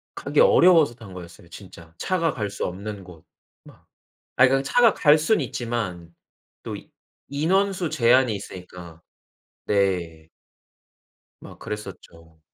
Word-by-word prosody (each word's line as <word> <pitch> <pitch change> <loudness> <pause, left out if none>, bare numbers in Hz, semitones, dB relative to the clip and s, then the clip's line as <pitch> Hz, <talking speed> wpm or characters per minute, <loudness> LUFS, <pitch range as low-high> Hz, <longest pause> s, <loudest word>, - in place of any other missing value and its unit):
가기 - - -2
어려워서 180 - +5
탄 110 -6 -13
거였어요 85 -1 -12
진짜. 85 -5 -14
차가 170 - -1
갈 105 -4 -4
수 100 - -4
없는 100 +2 -6
곳 85 -4 -15 0.4
막. - - -19 0.5
아이 130 0 +5
그 135 +1 +1
차가 235 - +4
갈 150 -1 +4
수는 165 +5 +1
있지만 115 -10 -5 0.5
또 - - -6 0.5
인원수 180 +4 0
제한이 125 -2 +3
있으니까. 90 -4 -11 0.6
네. 90 -6 -1 1.1
막 - - -13
그랬었죠. 85 -6 -10
105 Hz, 235 characters per minute, -23 LUFS, 90-145 Hz, 1.1 s, 어려워서